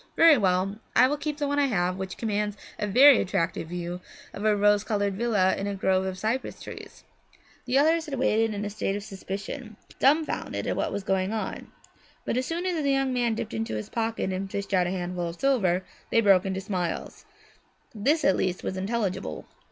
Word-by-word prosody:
Very 330 -2 +8
well, 195 -2 +1 0.2
I 255 - +7
will 290 - 0
keep 300 0 -4
the 290 -1 -1
one 285 0 0
I 285 - +3
have, 180 -6 0
which 190 0 -6
commands 210 -2 -1 0.2
a 210 - -1
very 260 +6 +7
attractive 175 -4 -1
view 175 +1 -5 0.3
of 200 - -6
a 215 -1 +3
rose 205 0 +3
coloured 205 -2 0
villa 200 -3 +2
set - - -2
in 195 - -2
a 200 - -2
grove 190 0 +1
of 185 -1 -4
cypress 220 +7 -2
trees.' - - -10 0.6
The 255 +1 +1
others 320 +3 +3
had 275 -2 -4
waited 225 -3 +2
in 205 +1 -3
a - - -2
state 200 -1 -2
of 205 - -4
suspension, 200 +4 -7 0.2
dumbfounded 305 +4 +1
at - - -1
what - - -1
was 200 - -3
going 190 +1 0
on. 220 - -4 0.6
But - - -1
as 255 +1 -1
soon 340 +2 -3
as 350 -4 0
the 280 - +1
young 270 -1 +1
man 240 -2 +1
dipped - - -5
into 110 0 -3
his 105 - -5
pocket 225 -4 -2
and 195 +1 -3
fished 200 0 -4
out 180 -2 +3
a - - -1
handful 180 -1 -3
of 170 0 -7
silver, 190 -10 +2 0.2
they - - +3
broke 195 -3 +4
into 190 0 -2
smiles; 185 - -4 0.7
this 275 +8 +1
at 190 - +5
least 180 -1 -1
was 190 - -3
intelligible. 190 - -2
205 Hz, 210 wpm, -26 LUFS, 185-250 Hz, 0.7 s, Very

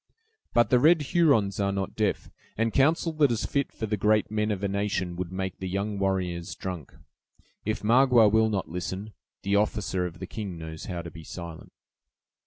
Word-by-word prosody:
"But 120 -3 +4
the 125 - +6
red 155 +3 +5
Hurons 125 - +3
are 100 -1 +1
not 95 -1 -3
deaf; 105 -2 -1 0.3
and 115 0 +1
counsel 160 +4 +3
that 150 -4 +3
is 115 - -1
fit 140 -1 -1
for 110 - -4
the 105 0 -1
great 105 +1 +2
men 105 0 0
of 100 -2 -2
a - - +2
nation 100 -3 -1
would 90 0 -4
make 95 0 -4
the 95 - -4
young 100 +2 -2
warriors 90 -3 -1
drunk. 90 -6 -6 0.7
If 110 +1 -2
Magua 120 0 +6
will 110 0 +4
not 100 -3 -1
listen, 95 +4 -5 0.3
the 100 +1 +2
officer 100 -3 0
of 85 -1 -10
the 95 - -6
king 95 -2 -6
knows 80 -1 -7
how 85 -2 -4
to 85 - -8
be 80 0 -11
silent." 85 0 -9
100 Hz, 195 wpm, -27 LUFS, 90-110 Hz, 0.7 s, the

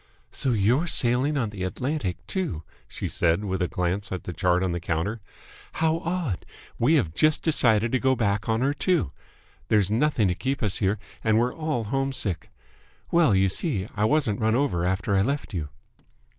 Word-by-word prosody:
"So 130 - 0
you're 120 - +2
sailing 130 +1 +3
on 115 -6 -1
the 100 -3 -8
Atlantic, 125 - -3
too!" 140 - -3 0.2
she - - -5
said, 85 +4 +1
with 95 -1 -2
a 90 - +1
glance 90 +4 -2
at 95 - -4
the 90 - -5
chart 90 +1 +1
on 95 - 0
the 85 - -2
counter. 85 +7 -2 0.5
"How 160 0 +1
odd! 165 - -2 0.4
We 140 +8 +4
have 95 - +1
just 155 - +2
decided 115 -8 +3
to 130 - +2
go 130 0 +2
back 105 -2 -1
on 110 +1 +1
her 140 +2 +2
too. 170 - 0 0.6
There's 105 -2 +2
nothing 115 -2 +2
to - - +1
keep 130 +9 -3
us 100 -3 +1
here 100 +1 +1 0.3
and 110 -1 +3
we're 120 +2 +1
all 155 -7 -2
homesick. 115 - -2 0.6
Well, 165 - +4
you 95 0 +4
see 100 - -1
I 105 +1 +1
wasn't 125 -6 +1
run 110 +1 +2
over 125 -11 +1
after 95 +1 0
I 95 - +4
left 140 +1 -2
you." 80 -5 -3
110 Hz, 185 wpm, -25 LUFS, 95-140 Hz, 0.6 s, We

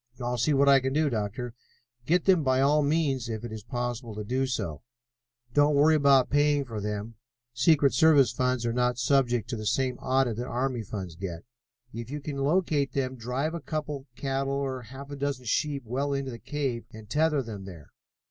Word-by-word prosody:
"I'll 125 0 -2
see 140 +5 +2
what 140 +1 +4
I 140 -1 +7
can 130 0 -2
do, 150 -1 +2
Doctor." 115 +2 -3 0.5
"Get 175 +2 +2
them 185 -4 +5
by 130 -2 +2
all 145 +3 +4
means, 140 -5 0
if 110 0 -4
it 120 - -6
is 110 -1 -6
possible 120 -1 -4
to 105 - -4
do 130 +5 0
so. 100 - -3 0.7
Don't 145 0 +4
worry 150 +3 +5
about 140 -4 +4
paying 145 -1 +3
for 115 -4 -5
them: 105 +2 -4 0.4
secret 140 +3 +4
service 145 -7 +5
funds 125 -2 0
are 115 - 0
not 125 0 +1
subject 125 -2 +2
to - - -1
the 110 -1 -4
same 130 +4 0
audit 130 -4 +1
that 120 +1 -3
army 125 -1 -1
funds 95 -4 -6
get. 85 -2 -6 0.5
If 115 +1 -6
you 145 +2 -4
can 145 -1 -5
locate 145 -1 +1
them, 130 -1 -1
drive 130 +6 -2
a 170 - -3
couple 150 0 -3
of 135 -3 -12
cattle 135 0 -2
or 135 -2 -2
half 135 +4 -10
a - - -4
dozen 140 -2 -3
sheep 140 +3 0
well 135 +5 -1
into 135 -1 -2
the 115 - -8
cave 135 -5 -3
and 110 -1 -11
tether 150 +1 +1
them 105 -4 -7
there. 85 -7 -11
130 Hz, 205 wpm, -28 LUFS, 115-145 Hz, 0.7 s, I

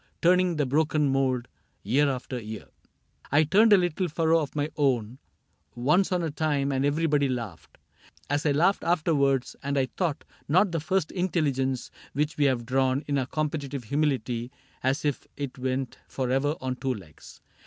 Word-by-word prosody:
Turning 180 0 +3
the 150 -2 +1
broken 150 +2 +2
mould, 130 -3 +1 0.4
year 140 +8 +3
after 130 -1 -4
year.'... 110 0 -8 0.4
" - - -27
I - - +6
turned 210 +8 +4
a 205 - +9
little 175 0 0
furrow 165 +1 +2
of 150 -2 -4
my 145 +1 -1
own 130 -4 0 0.6
Once 150 +12 +2
on 180 -1 +1
a 160 - -1
time, 145 -2 0
and 135 0 0
everybody 145 -1 +2
laughed 115 -9 -6 0.3
— - - -26
As 145 +1 0
I 150 - +2
laughed 170 +8 +2
afterwards; 150 -6 +1
and 140 0 -2
I 130 -2 +1
doubt 165 -6 -1 0.2
not 185 +5 +3
The 165 - -1
First 160 +2 0
Intelligence, 140 -8 -1 0.2
which 150 +2 -1
we 145 - +4
have 125 -4 +1
drawn 130 +2 +1
In 140 -1 0
our 130 - -2
competitive 145 -3 -3
humility 125 -3 -1 0.3
As 135 +4 0
if 145 -2 -1
it 140 -2 -5
went 130 0 -2
forever 135 +3 0
on 130 -1 -3
two 130 -1 -1
legs. 85 -8 -13
140 Hz, 175 wpm, -27 LUFS, 130-155 Hz, 0.6 s, a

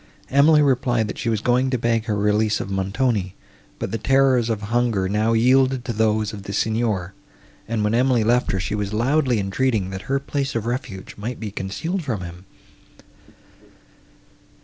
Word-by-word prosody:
Emily 150 +2 +5
replied, 125 -4 +1
that - - -6
she 115 - -1
was 110 -2 0
going 125 +3 +2
to 130 - 0
beg 115 -1 0
her 105 -3 -1
release 105 +1 +1
of 100 - -5
Montoni; 95 0 -1 0.4
but - - -4
the 115 - -2
terrors 130 -1 +3
of 110 -2 -2
hunger 115 -6 +1
now 105 +3 +1
yielded 130 +2 +3
to 120 - -2
those 110 -1 +1
of 105 - -7
the 100 0 -7
Signor, 110 -4 -1 0.5
and, 110 -1 -1
when 105 +1 +1
Emily 125 -1 +3
left 120 +3 +2
her, 95 - -1
she 95 - -3
was 105 -1 -2
loudly 130 +2 +2
entreating, 100 0 0
that 95 0 -5
her 135 - +2
place 140 -1 -3
of 115 -2 -2
refuge 120 -6 -5
might 115 +4 -5
be 110 -2 -5
concealed 160 - -3
from 115 -9 -3
him. 90 +1 -9
115 Hz, 175 wpm, -22 LUFS, 105-125 Hz, 0.5 s, Emily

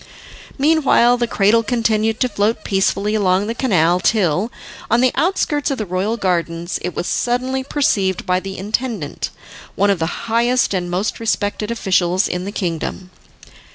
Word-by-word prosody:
Meanwhile 275 -5 +4
the 240 -1 0
cradle 215 +1 +3
continued 225 -1 0
to 255 - +4
float 210 0 0
peacefully 200 +1 0
along 195 -2 +2
the 225 - -2
canal 180 -9 +2
till, 190 +1 +1 0.4
on 230 - +3
the 255 0 +4
outskirts 320 -5 0
of 275 - -2
the 215 - -3
royal 195 +5 -1
gardens, 175 -3 -1
it 180 0 -4
was - - -2
suddenly 255 +4 -1
perceived 200 - 0
by 180 -1 +1
the 195 0 -7
intendant, 210 - -3 0.5
one 200 +1 +3
of 195 - 0
the 165 +7 -3
highest 235 +1 +2
and 180 -2 -2
most 185 +5 -2
respected 210 -1 -1
officials 190 -4 +1
in 180 +1 -3
the 200 - -4
kingdom. 180 -1 -4
210 Hz, 155 wpm, -19 LUFS, 185-235 Hz, 0.5 s, Meanwhile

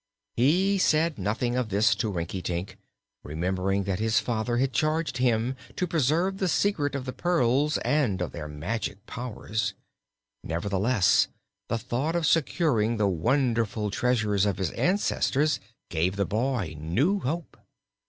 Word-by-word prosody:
He 185 +11 +3
said 155 - +2
nothing 110 +5 -1
of 125 -3 -1
this 105 +4 +3
to 110 - -1
Rinkitink, 90 0 -3 0.5
remembering 95 +5 -1
that 95 -2 -2
his 110 +1 +2
father 120 0 -1
had 130 +1 +1
charged 155 -3 0
him 125 0 +1 0.2
to 180 - 0
preserve 170 +4 +1
the 190 - +1
secret 150 -3 +1
of 135 -2 -3
the 130 - -4
pearls 150 -3 +2
and 130 -11 +1
of 90 - -2
their 80 -3 -6
magic 100 +7 -4
powers. 110 -5 -3 0.7
Nevertheless, 100 +5 +2 0.4
the 115 - +1
thought 135 +8 -2
of 170 -1 +1
securing 140 -8 +2
the 105 - +2
wonderful 110 - 0
treasures 105 -3 +1
of 100 - -1
his 95 -4 -1
ancestors 155 -6 +1 0.3
gave 90 +3 0
the 100 0 0
boy 110 - -1
new 130 - +1
hope. 165 +2 -4
120 Hz, 140 wpm, -27 LUFS, 100-145 Hz, 0.7 s, He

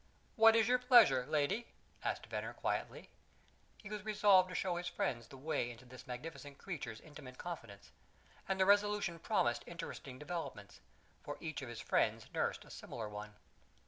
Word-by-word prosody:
"What 225 0 +8
is 225 -1 +4
your 250 0 +4
pleasure, 230 - +6
lady?" 175 +11 +1 0.4
asked - - -2
Venner - - -4
quietly. - - -3 0.7
He 210 - -10
was 210 -2 -4
resolved 205 -3 +5
to 180 - -6
show 180 -2 0
his 175 0 -3
friends 120 -8 -2
the 135 - -12
way 135 -3 -1
into 120 +1 -11
this 125 0 -12
magnificent 140 +2 -7
creature's 150 - -5
intimate 145 -4 -11
confidence; 115 - -8 0.6
and 190 0 0
the 190 - +5
resolution 205 -3 +3
promised 120 -6 +1
interesting 140 -6 -7
developments, 165 +4 -6 0.4
for - - -5
each 155 -3 -4
of 130 - -6
his 120 - -6
friends - - +1
nursed - - -1
a - - -14
similar 115 -3 -6
one. 105 0 -8
160 Hz, 165 wpm, -36 LUFS, 125-200 Hz, 0.7 s, What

